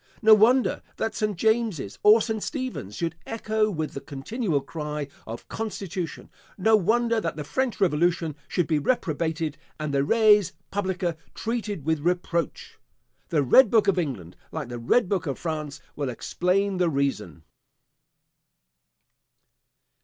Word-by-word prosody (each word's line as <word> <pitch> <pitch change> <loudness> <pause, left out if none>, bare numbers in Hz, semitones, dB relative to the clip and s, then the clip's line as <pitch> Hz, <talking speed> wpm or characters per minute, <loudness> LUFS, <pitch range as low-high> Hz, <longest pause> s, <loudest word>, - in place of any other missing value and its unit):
No 220 0 +8
wonder, 240 +5 +4 0.2
that 225 - -1
St. 210 -3 -1
James's 220 - 0
or 215 +2 +7
St. 220 -2 -2
Stephen's 255 - -4
should 165 -2 -2
echo 220 -1 0
with 155 -6 -3
the 140 - -6
continual 155 - -2
cry 150 0 -5 0.2
of 115 +1 -7
constitution; 195 -6 -5 0.3
no 220 +3 +4
wonder, 230 +3 +2
that 165 - -2
the 150 - -5
French 255 - -2
revolution 170 -2 +1
should 175 - 0
be 155 -1 +1
reprobated, 160 - -1 0.2
and 150 -2 -3
the 140 0 +2
res 210 +1 +4 0.2
publica 185 -4 -1 0.2
treated 220 - -3
with 160 -1 +1
reproach! 170 +1 -2 0.5
The 150 -4 +2
red 225 - +6
book 215 -2 +3
of 195 -2 +3
England, 105 - -4 0.2
like - - -5
the 120 -1 -5
red 185 - +2
book 185 -4 -1
of 135 - -2
France, 155 -3 -4 0.2
will 145 -3 -2
explain 185 +9 0
the 180 -2 +2
reason. 135 - -2
175 Hz, 140 wpm, -25 LUFS, 150-215 Hz, 0.5 s, No